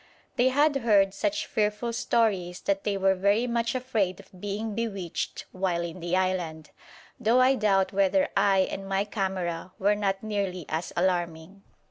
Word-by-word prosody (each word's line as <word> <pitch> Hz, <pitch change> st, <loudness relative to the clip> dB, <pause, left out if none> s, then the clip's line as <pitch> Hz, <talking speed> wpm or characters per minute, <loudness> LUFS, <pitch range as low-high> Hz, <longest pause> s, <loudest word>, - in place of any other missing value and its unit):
They 250 Hz, +2 st, +4 dB
had 290 Hz, +2 st, +3 dB
heard 205 Hz, -6 st, +3 dB
such 305 Hz, +9 st, -1 dB
fearful 215 Hz, +2 st, -1 dB
stories 195 Hz, -7 st, 0 dB
that 195 Hz, 0 st, -1 dB
they 200 Hz, -1 st, 0 dB
were 195 Hz, 0 st, +3 dB
very 200 Hz, +5 st, +2 dB
much 235 Hz, 0 st, -1 dB
afraid 220 Hz, -8 st, -1 dB
of 185 Hz, -, -16 dB
being 205 Hz, +2 st, -3 dB
bewitched 200 Hz, -6 st, -4 dB
while 185 Hz, -2 st, -1 dB
in 170 Hz, +1 st, -6 dB
the 175 Hz, +1 st, 0 dB
island, 175 Hz, -5 st, -2 dB, 0.5 s
though 240 Hz, +1 st, +3 dB
I 255 Hz, +1 st, +5 dB
doubt 195 Hz, -6 st, +2 dB
whether 200 Hz, +10 st, +3 dB
I 195 Hz, -1 st, +4 dB
and 195 Hz, 0 st, -6 dB
my 195 Hz, +1 st, +1 dB
camera 185 Hz, -4 st, -3 dB
were 205 Hz, +2 st, +3 dB
not 195 Hz, -1 st, -1 dB
nearly 200 Hz, -5 st, -2 dB
as 160 Hz, +2 st, -3 dB
alarming. 175 Hz, +1 st, -1 dB
195 Hz, 160 wpm, -27 LUFS, 185-220 Hz, 0.5 s, I